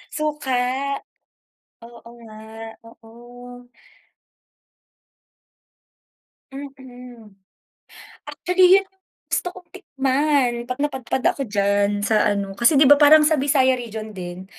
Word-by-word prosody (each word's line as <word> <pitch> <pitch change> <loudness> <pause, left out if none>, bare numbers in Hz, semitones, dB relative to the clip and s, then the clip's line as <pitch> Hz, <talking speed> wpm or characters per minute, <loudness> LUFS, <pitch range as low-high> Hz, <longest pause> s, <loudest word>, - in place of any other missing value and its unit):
Suka, 300 -3 -4 1.3
oo 235 0 -15
nga, 220 -1 -14 0.5
oo. 245 +2 -15 2.8
Mm. 250 -5 -12 1.0
Actually 365 +1 +3
'yon 390 - -2
yung - - -33 0.4
gusto - - -1
kong 360 -2 -15
tikman, 275 -6 0 0.2
'pag 250 +2 -5
napadpad 265 -2 -3
ako 275 - -7
diyan 205 0 0
sa 215 -1 +2
ano, 200 -1 -3
kasi 235 +8 +3
'di 285 - +5
ba 290 - +8
parang 300 +1 +6
sa 310 -1 +2
Visayas 260 -3 +2
region 220 -2 -8
din, 180 0 -8
250 Hz, 105 wpm, -21 LUFS, 220-290 Hz, 2.8 s, ba